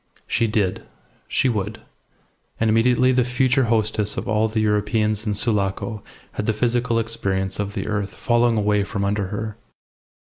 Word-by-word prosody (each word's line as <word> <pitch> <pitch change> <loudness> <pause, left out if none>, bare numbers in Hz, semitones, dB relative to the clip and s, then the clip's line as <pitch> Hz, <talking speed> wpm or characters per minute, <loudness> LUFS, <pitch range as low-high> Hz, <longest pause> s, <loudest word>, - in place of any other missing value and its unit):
She 115 - +1
did. 105 -4 0 0.5
She - - +1
would. 105 -3 -2 0.8
And 110 -1 +2
immediately 125 +3 +4
the 125 -1 +3
future 125 +1 +2
hostess 110 -2 +1
of - - -3
all 110 +2 +2
the 110 0 -2
Europeans 105 0 +1
in 105 - 0
Sulaco 105 0 -1 0.3
had 105 - -4
the 110 - +2
physical 120 0 +1
experience 100 -4 -2
of 100 +1 -3
the 95 - -3
earth 100 -2 -3
falling 120 -2 +2
away 105 -1 +2
from 100 0 -3
under 100 -1 0
her. 105 +2 -5
110 Hz, 160 wpm, -22 LUFS, 105-115 Hz, 0.8 s, immediately